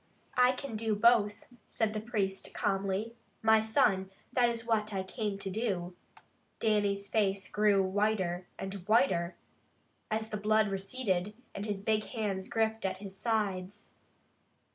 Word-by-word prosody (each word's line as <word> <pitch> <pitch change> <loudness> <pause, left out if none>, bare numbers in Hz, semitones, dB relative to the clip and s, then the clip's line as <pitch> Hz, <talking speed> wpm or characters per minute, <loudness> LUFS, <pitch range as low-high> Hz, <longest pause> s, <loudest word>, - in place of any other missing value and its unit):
"I 250 +1 +6
can 255 -2 -6
do 220 0 0
both," 210 -1 +4 0.2
said 220 -2 0
the 215 - -2
priest 205 -4 -2
calmly. 195 +3 -1 0.3
"My 220 0 +6
son, 195 -3 +2 0.2
that 245 -1 +4
is 230 -1 -4
what 220 -2 +1
I 190 - -1
came 205 +1 -3
to 195 0 -5
do." 185 -5 -2 0.6
Dannie's 205 -2 +1
face 200 -3 +1
grew 210 -2 +3
whiter 190 -2 0
and 195 0 -5
whiter, 185 -4 +3 0.7
as 220 0 -1
the 215 - -3
blood 215 +1 +3
receded, 195 -1 -1 0.2
and 200 +2 -4
his 205 -2 -2
big 215 0 +1
hands 200 -4 -3
gripped 220 0 0
at 190 -1 -1
his 195 0 -8
sides. 200 -4 -2
210 Hz, 140 wpm, -31 LUFS, 195-220 Hz, 0.7 s, I